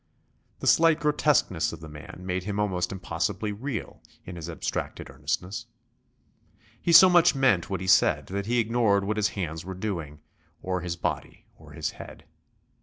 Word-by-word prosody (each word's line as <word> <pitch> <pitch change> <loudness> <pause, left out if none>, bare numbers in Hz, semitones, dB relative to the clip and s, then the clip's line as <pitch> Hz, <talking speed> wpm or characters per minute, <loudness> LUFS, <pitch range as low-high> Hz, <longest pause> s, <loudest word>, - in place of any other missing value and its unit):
The - - -4
slight 165 -1 +5
grotesqueness 150 - +1
of 85 - -8
the 80 - -10
man 75 +4 -11
made 90 0 -2
him 100 0 -3
almost 95 -4 -1
impossibly 95 +3 -2
real 110 +1 -5 0.2
in 90 - -8
his 85 -1 -7
abstracted 80 -3 -4
earnestness. 90 - -4 1.1
He 170 - +1
so 175 +3 +10
much 175 -4 +5
meant 130 -11 +2
what 95 -2 -3
he - - -4
said 95 - +4
that 100 +1 -4
he 120 +1 +1
ignored 110 -3 +2
what 105 +2 -2
his 105 -1 +2
hands 80 -4 -3
were 95 +1 -7
doing, 85 -7 -5 0.4
or 90 -1 -2
his 85 -1 -3
body 85 -4 -4
or - - -16
his - - -3
head. - - -11
95 Hz, 170 wpm, -26 LUFS, 85-115 Hz, 1.1 s, so